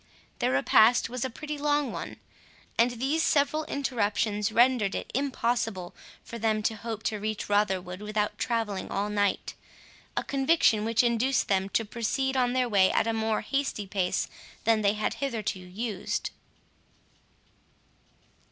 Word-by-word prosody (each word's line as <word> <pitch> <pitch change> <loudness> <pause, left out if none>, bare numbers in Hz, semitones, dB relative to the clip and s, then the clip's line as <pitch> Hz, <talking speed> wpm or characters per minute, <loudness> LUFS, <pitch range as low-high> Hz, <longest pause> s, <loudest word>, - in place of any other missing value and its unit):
Their - - +1
repast 220 - +4
was 250 0 -3
a 260 - -1
pretty 300 +4 -6
long 290 -3 +1
one; - - -6 0.6
and 235 +2 +4
these 270 +7 0
several 300 +1 +2
interruptions 215 -5 -1
rendered 235 -3 +3
it - - -5
impossible 235 -8 -1 0.3
for 235 - -8
them 215 -1 +1
to 220 - 0
hope 220 0 -6
to 215 - -1
reach 215 0 -3
Rotherwood 190 -2 0
without 210 0 -2
travelling 225 -5 -2
all 205 +1 -2
night, 205 -1 0 0.6
a - - +1
conviction 270 -6 +2
which 230 +1 +2
induced 240 +2 +1
them 195 0 +1
to 225 - -3
proceed 255 +5 -1
on 250 -1 +2
their 255 -1 +2
way 195 -4 +4
at - - +2
a 225 - 0
more 220 -1 0
hasty 270 -3 -2
pace 190 -2 -1 0.4
than 225 -1 +3
they 200 -1 +3
had 215 0 -1
hitherto 225 -8 -2
used. 190 +3 -4
225 Hz, 145 wpm, -28 LUFS, 205-255 Hz, 0.6 s, repast